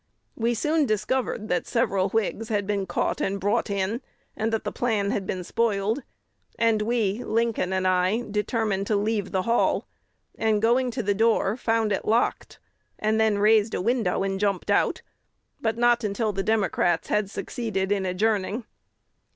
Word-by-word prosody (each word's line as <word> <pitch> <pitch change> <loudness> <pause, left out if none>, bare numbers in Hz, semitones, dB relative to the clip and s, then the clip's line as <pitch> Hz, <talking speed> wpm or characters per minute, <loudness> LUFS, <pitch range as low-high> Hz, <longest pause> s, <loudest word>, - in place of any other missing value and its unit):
We 235 +1 0
soon 300 +4 +1
discovered 215 +1 -1
that 180 - 0
several 200 -6 +1
Whigs 225 +1 -1
had 205 -2 0
been 200 -1 -1
caught - - -1
and 195 +1 -1
brought 210 +4 0
in, 200 +4 -1 0.3
and 220 +1 -1
that 225 - -1
the - - -3
plan 210 -4 0
had 195 -2 -2
been 185 -1 -3
spoiled; 220 +4 0 0.6
and 225 -2 +2
we 220 0 0
Lincoln 225 -5 0
and 185 0 0
I 185 +5 +2
determined 210 -2 -1
to 215 - +1
leave 205 -1 -1
the 190 -2 0
hall, 235 +3 +1 0.5
and, 220 -1 +1
going 245 +4 +2
to 240 0 -3
the 205 - +1
door, 220 -1 +2
found 225 -3 0
it 195 - 0
locked, 230 +2 0 0.4
and 220 +1 +1
then 220 -2 +3
raised 215 +1 +3
a - - -1
window 225 -3 +1
and 195 0 -2
jumped 200 -2 0
out, - - +1 0.6
but 225 0 0
not 240 0 +3
until 210 +1 -1
the 195 - -1
Democrats 195 -5 +1
had 210 -2 +1
succeeded 200 -3 -3
in 200 -1 +1
adjourning. 205 +4 0
215 Hz, 165 wpm, -25 LUFS, 195-230 Hz, 0.6 s, then